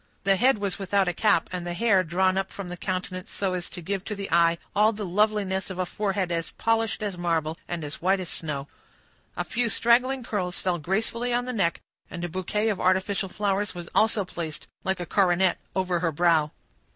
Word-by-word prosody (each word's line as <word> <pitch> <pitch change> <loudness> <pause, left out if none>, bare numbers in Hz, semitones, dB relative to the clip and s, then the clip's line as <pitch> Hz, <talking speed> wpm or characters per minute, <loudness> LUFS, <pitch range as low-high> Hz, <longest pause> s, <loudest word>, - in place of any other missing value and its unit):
The 195 0 +4
head 250 +5 +4
was 200 -2 -3
without 195 0 +1
a 180 - +1
cap, 205 -2 +3
and 180 -1 -3
the 175 0 -4
hair 195 -2 +4
drawn 185 +2 +2
up 195 0 -1
from 195 -3 -6
the 180 - -5
countenance 185 0 -4
so 195 -2 -1
as 180 -1 -3
to 175 - -7
give 195 +2 -2
to 210 - -3
the 200 -1 -6
eye 170 0 +4 0.2
all 210 +2 +5
the 210 -2 -5
loveliness 200 0 +1
of 190 - -6
a 185 - 0
forehead 195 -1 -1
as 165 -1 -1
polished 225 -1 0
as 195 -4 -3
marble 165 -2 0
and 170 -2 -3
as 145 0 -6
white 190 +2 +3
as 185 - -4
snow. 145 -4 -4 0.7
A - - 0
few 240 0 0
straggling 250 +3 +3
curls 185 -6 -2
fell 180 -2 -1
gracefully 225 +8 -1
on 245 +1 +1
the 250 - -3
neck, 185 -7 0 0.3
and 175 -1 -6
a 175 - -2
bouquet 200 +5 -1
of 205 - -1
artificial 190 +1 +1
flowers 205 0 -1
was 175 -1 -7
also 215 -2 +3
placed, 165 -4 -5 0.2
like 190 0 0
a 175 - -3
coronet, 185 0 +3 0.2
over 185 -2 +1
her 165 -1 +1
brow. 160 -1 +3
190 Hz, 210 wpm, -26 LUFS, 175-205 Hz, 0.7 s, all